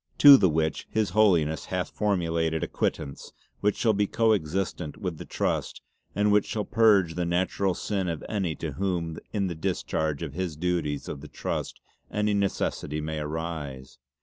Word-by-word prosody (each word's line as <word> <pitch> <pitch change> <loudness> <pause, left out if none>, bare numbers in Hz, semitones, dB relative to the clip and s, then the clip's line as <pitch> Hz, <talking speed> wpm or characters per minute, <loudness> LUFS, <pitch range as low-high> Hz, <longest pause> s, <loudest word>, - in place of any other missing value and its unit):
To 145 -1 +11
the 95 -8 +4
which 80 0 -1
His 110 -4 0
Holiness 85 -7 +3
hath - - -3
formulated 85 -5 0
a - - -1
Quittance 70 - -3 0.3
which 105 0 +1
shall 110 -2 +2
be 100 0 +1
co 115 +1 +3
existent 90 -3 -2
with 90 -6 -4
the - - -7
Trust - - -2 0.3
and 105 0 +3
which 105 0 +3
shall 105 -2 -2
purge 105 -7 +4
the 90 - -1
natural 90 +2 0
sin 95 -3 -2
of 80 -2 -4
any 95 -7 -1
to 80 - -4
whom 85 0 -2
in 100 -3 0
the 90 - -2
discharge 80 -3 -2
of - - -5
the 90 -2 -3
duties 80 -4 -1
of 70 - -6
the 75 - -9
Trust - - -4 0.3
any 105 0 0
necessity 100 -6 -1
may 80 0 -3
arise. 75 -4 -5
90 Hz, 175 wpm, -27 LUFS, 80-100 Hz, 0.3 s, To